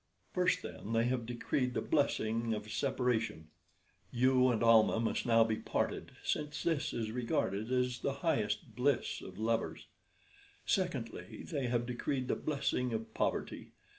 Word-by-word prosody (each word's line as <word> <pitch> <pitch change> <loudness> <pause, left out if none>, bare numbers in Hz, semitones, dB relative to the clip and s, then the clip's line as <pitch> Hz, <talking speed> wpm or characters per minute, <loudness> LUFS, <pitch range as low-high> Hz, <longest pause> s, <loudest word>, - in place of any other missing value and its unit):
"First, - - +2
then, 110 - -6
they 115 0 +3
have 120 -1 0
decreed 125 +1 -1
the - - +2
blessing 115 -6 +1
of 105 0 -6
separation. 115 - 0 0.6
You 130 +1 +4
and 115 -2 +1
Almah 115 -1 +6
must 115 +1 -1
now 115 -1 +6
be 110 -1 0
parted, - - -2
since 150 -1 -2
this 165 -4 0
is 110 -2 -3
regarded 115 -2 -1
as 125 -1 +1
the 140 - 0
highest 105 -10 0
bliss 135 +1 +1
of 95 0 -10
lovers. 115 +1 -1 0.8
"Secondly, - - -2
they 135 -3 -2
have 120 0 0
decreed 130 +1 -2
the - - +2
blessing 135 -4 -1
of 110 0 -4
poverty. - - -2
120 Hz, 145 wpm, -34 LUFS, 110-130 Hz, 0.8 s, Almah